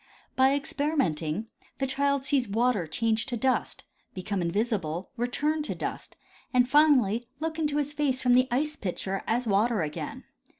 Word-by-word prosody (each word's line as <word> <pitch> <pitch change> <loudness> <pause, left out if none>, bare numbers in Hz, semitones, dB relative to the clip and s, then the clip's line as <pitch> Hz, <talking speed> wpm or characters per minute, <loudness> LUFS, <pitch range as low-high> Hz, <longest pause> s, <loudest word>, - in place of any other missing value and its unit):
By 265 +1 +4
experimenting 265 - -1 0.3
the 270 - 0
child 280 +1 0
sees 275 -3 +2
water 220 -3 +1
changed 225 - 0
to 240 - -2
dust, 260 +3 0 0.3
become 190 +1 -2
invisible, 185 -2 -1
return 295 +6 0
to 300 - -3
dust, - - -5 0.3
and, 250 -1 +4
finally, 250 -6 +4
look 320 +1 -3
into 295 -2 0
his 290 0 -1
face 285 -4 0
from 250 -1 +3
the 255 +1 +5
ice 295 +5 0
pitcher 195 - -3
as 240 +3 0
water 215 -1 +2
again. 150 0 -5
245 Hz, 155 wpm, -27 LUFS, 205-280 Hz, 0.3 s, the